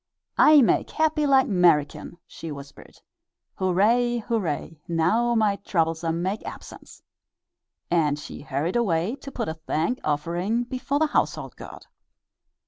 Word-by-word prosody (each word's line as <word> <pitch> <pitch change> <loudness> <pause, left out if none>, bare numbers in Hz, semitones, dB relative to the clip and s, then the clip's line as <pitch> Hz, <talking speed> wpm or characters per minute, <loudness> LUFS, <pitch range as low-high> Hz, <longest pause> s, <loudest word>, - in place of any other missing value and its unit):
"I 300 -3 +7
make - - +2
happy 310 -1 +1
like 270 -1 +5
'Merican," 170 -5 +2
she 165 - -8
whispered. 140 -1 -11 0.5
"Hooray, 220 +7 +2
hooray! 180 -9 -3
now 195 +9 +1
my 210 -3 +2
troublesome 165 -2 -1
make 195 +4 -2
absence," - - -11 0.9
and 155 -4 +2
she 150 - -9
hurried 145 - -2
away 190 -1 0
to 275 - -10
put - - -3
a 160 - -2
thank 160 +8 -2
offering 170 +10 -1
before 255 +3 -3
the 315 - +3
household 300 - -1
god. - - -11
185 Hz, 130 wpm, -25 LUFS, 160-240 Hz, 0.9 s, I